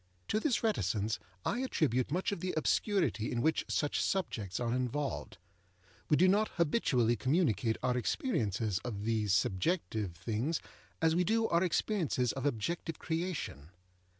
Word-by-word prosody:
To 215 - +2
this 245 0 +1
reticence 110 - 0 0.3
I 240 - 0
attribute 150 - +1
much 180 +7 0
of 200 - -3
the 185 +2 -3
obscurity 170 - +1
in 120 - -1
which 160 +6 +1
such 145 - 0
subjects 110 - -1
are 120 -1 0
involved. 130 +3 -2 0.7
We 150 - +5
do 185 - +5
not 205 +3 +4
habitually 135 - +2
communicate 125 - +1
our 125 -1 +2
experiences 110 - 0
of 105 -5 -4
these 110 -2 0
subjective 105 - 0
things 115 - -1 0.4
as 160 0 +4
we 180 - +3
do 225 +4 +2
our 170 +1 +3
experiences 170 - +1
of 135 +1 -2
objective 155 +6 -2
creation. 160 - -3
135 Hz, 145 wpm, -33 LUFS, 110-180 Hz, 0.7 s, We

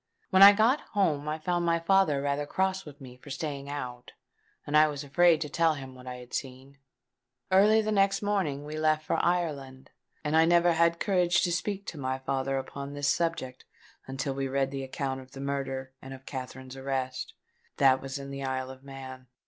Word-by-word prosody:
When 190 - +5
I 200 +1 +12
got 225 +7 +3 0.2
home 150 -7 +1
I 155 - -2
found 175 +2 -1
my 170 0 +2
father 165 -5 +2
rather 145 +1 -1
cross 190 +2 -1
with 145 -1 -12
me 125 -2 -12
for 135 - -14
staying 140 0 -5
out; 125 -4 -6 0.5
and 145 - -2
I 155 0 +7
was 145 -1 -5
afraid 165 +3 +4
to 150 - -2
tell 160 +1 +2
him 135 -2 -9
what 130 0 -13
I 125 - -5
had 125 0 -12
seen. 135 +1 -6 0.7
Early 210 +3 +5
the 215 - -1
next 195 -1 +2
morning 185 -9 -1
we 155 +1 -5
left 155 0 +1
for - - 0
Ireland; 145 -7 -2 0.3
and 150 +1 0
I 160 0 +6
never 175 +1 +4
had 170 +1 +2
courage 180 -3 +2
to 175 - +1
speak 200 +3 -2
to 155 - -7
my 130 -1 -2
father 135 0 -2
upon 140 +1 -6
this 145 0 0
subject 165 -7 -1 0.4
until 135 +1 -3
we 135 0 -2
read 135 0 0
the 135 -1 -4
account 130 0 -4
of 130 +1 -17
the 135 - -9
murder 135 -1 -3
and 135 0 -8
of 135 0 -16
Katherine's 130 -1 -7
arrest. 130 -1 -4 0.4
That 130 -1 +4
was 135 +1 -5
in 140 0 -7
the 140 0 -5
Isle 130 0 -3
of 130 0 -13
Man." 130 -2 -10
140 Hz, 205 wpm, -28 LUFS, 135-170 Hz, 0.7 s, I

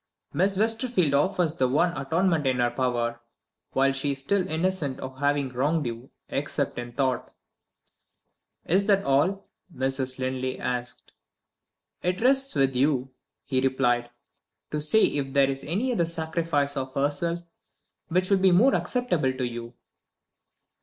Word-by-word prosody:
Miss 195 +2 +1
Westerfield 225 - +1
offers 160 +2 +2
the 130 -5 +1
one 170 +7 +1
atonement 160 +2 +1
in 130 -1 +1
her 120 -1 +2
power, 120 -2 -1 0.5
while 135 0 +3
she 140 +1 0
is 135 - -4
still 185 +7 +1
innocent 160 -4 -1
of 130 0 -8
having 145 -1 +1
wronged 145 +5 0
you 120 +2 -6 0.2
except 140 -2 -2
in 120 0 -6
thought." 130 -2 -1 1.4
"Is 195 +5 +2
that 200 -1 +3
all?" 160 +9 +1 0.3
Mrs. 130 -2 -2
Linley 130 0 -2
asked. 125 -1 -4 0.9
"It 180 +1 0
rests 270 +3 +3
with 135 -2 +2
you," 135 -1 +1 0.3
he 130 -2 0
replied, 125 -2 +1 0.6
"to 150 - -1
say 155 +9 +3
if 135 -2 0
there 140 -1 +4
is 135 0 -5
any 210 - -1
other 170 -8 +1
sacrifice 160 -3 0
of 130 -1 -4
herself 145 +5 0 0.7
which 185 +3 0
will 195 - +5
be 190 0 +4
more 225 +10 +5
acceptable 175 - 0
to 130 0 -4
you." 120 0 -5
140 Hz, 145 wpm, -26 LUFS, 130-180 Hz, 1.4 s, will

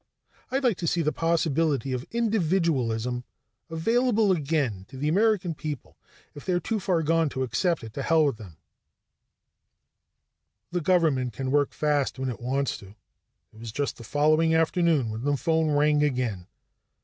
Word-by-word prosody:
"I'd 270 +2 -1
like 235 -7 +2
to 170 - -3
see 170 +1 +1
the 150 - +1
possibility 160 -5 0
of 125 0 -4
individualism 160 - 0 0.5
available 225 +5 +2
again 140 - 0
to 135 - -10
the 145 +3 -2
American 195 0 +2
people. 150 -1 -7 0.4
If 145 - -10
they're 180 -2 0
too 215 +5 -2
far 175 -3 0
gone 165 0 +2
to 130 -1 -3
accept 145 - 0
it, 110 -1 -9
to 140 - -4
hell 160 +2 +3
with 140 -6 0
them." 95 -8 -12 2.1
The 175 0 -1
government 150 -8 +2
can 130 +4 -3
work 145 0 +2
fast 145 -3 0
when 130 0 -2
it 120 - -6
wants 135 +2 -1
to. 100 +1 -14 0.6
It 110 - -16
was 115 -1 -7
just 140 +5 -2
the 115 - -10
following 155 +6 +2
afternoon 160 -6 +2
when 110 +1 -5
the 145 0 +1
phone 160 +1 +1
rang 150 0 +3
again. 125 -10 -1
150 Hz, 160 wpm, -26 LUFS, 130-170 Hz, 2.1 s, hell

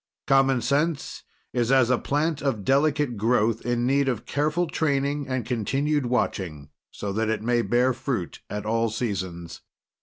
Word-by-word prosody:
Common 135 -2 +3
Sense 145 +3 0 0.3
is 120 0 +1
as 130 -2 +4
a 125 - +3
plant 150 +1 -1
of 130 -7 -1
delicate 140 -2 +2
growth, 110 0 +1
in 120 0 0
need 140 +2 +2
of 115 -4 -3
careful 155 +4 0
training 145 -2 -1
and 130 -3 -2
continued 135 +5 0
watching 85 - -2 0.2
so 100 -1 -5
that 110 +1 0
it 110 -1 -1
may 120 +1 +2
bear 125 +2 +2
fruit 120 -8 -4
at 105 0 -4
all 115 +1 +1
seasons. 95 -7 -4
125 Hz, 155 wpm, -25 LUFS, 110-140 Hz, 0.3 s, as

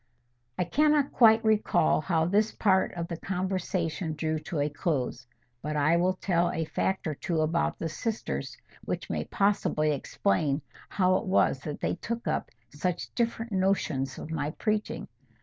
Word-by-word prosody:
I - - +2
cannot 295 - +3
quite 225 -2 +6
recall 215 -8 +3
how 160 -1 +1
this 210 +5 +2
part 190 -3 +3
of 170 -1 -3
the 170 -2 -5
conversation 180 -3 -2
drew 155 0 -1
to 155 +1 -5
a 145 - +2
close. 145 -5 -2 0.3
But 150 +1 -3
I 150 +3 +3
will 185 +2 +2
tell 175 -2 +1
a 160 -2 -2
fact 190 +4 -1
or 155 - -1
two 160 +2 -1
about 160 +2 0
the 165 - -3
sisters 220 +7 -3 0.3
which - - -4
may - - -2
possibly 195 -6 +1
explain 140 +1 0 0.3
how 185 -1 +3
it 220 - -5
was 185 -7 +3
that 145 +1 -6
they - - -1
took 235 +5 -4
up - - -1 0.2
such 175 +4 -3
different 230 -1 -1
notions 185 -8 0
of 160 - -7
my 150 -2 -1
preaching. 215 +6 -2
175 Hz, 165 wpm, -28 LUFS, 155-200 Hz, 0.3 s, quite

